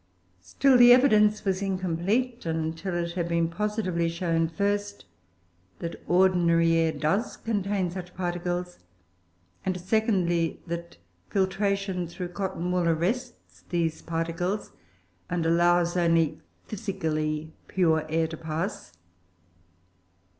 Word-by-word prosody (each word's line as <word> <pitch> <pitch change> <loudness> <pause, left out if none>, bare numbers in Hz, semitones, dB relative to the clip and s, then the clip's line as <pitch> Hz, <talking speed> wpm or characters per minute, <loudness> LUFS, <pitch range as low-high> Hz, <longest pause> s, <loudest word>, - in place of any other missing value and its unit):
Still 260 - +3
the 245 0 +9
evidence 215 -5 +5
was 190 0 0
incomplete 195 +6 -1
until 165 +3 -2
it 170 0 -1
had 170 -1 -2
been 170 -1 +1
positively 185 -3 -1
shown, 165 -1 0
first, 205 +3 -2 0.7
that 170 0 -6
ordinary 175 -2 +4
air 165 -1 +3
does 155 +9 -1
contain 200 -4 -1
such 180 0 -8
particles; 175 0 -3 0.8
and, 185 -1 -2
secondly, 180 -4 +1
that 170 0 -6 0.3
filtration 195 -1 0
through 175 +1 -6
cotton 180 -1 -3
wool 180 -2 +1
arrests 225 +10 -3
these 165 -2 -1
particles 170 +4 -2 0.6
and 175 -2 -1
allows 175 +1 +3
only 165 -3 +2 0.2
physically 160 -7 -3
pure 160 -4 +2
air 160 +1 +1
to 160 0 -6
pass. 160 - -4
175 Hz, 110 wpm, -27 LUFS, 165-195 Hz, 0.8 s, the